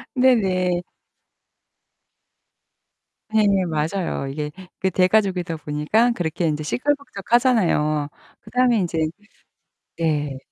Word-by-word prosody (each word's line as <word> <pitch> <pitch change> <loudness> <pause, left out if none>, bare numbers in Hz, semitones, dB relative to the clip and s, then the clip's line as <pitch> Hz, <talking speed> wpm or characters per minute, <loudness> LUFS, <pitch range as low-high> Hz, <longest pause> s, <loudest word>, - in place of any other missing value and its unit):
네 255 0 +5
네. 185 -4 0 2.5
네. 220 0 +3 0.2
맞아요. 160 -2 -2
이게 150 +2 -4 0.3
그 190 -1 0
대가족이다 185 -3 +1
보니까 155 +12 +1
그렇게 175 -4 -2
인제 150 0 -1
시끌벅적하잖아요. 220 - +1 0.3
그다음에 250 -2 +2
인제 175 -3 -2 1.0
네. 150 -4 -1
180 Hz, 210 characters per minute, -22 LUFS, 155-220 Hz, 2.5 s, 네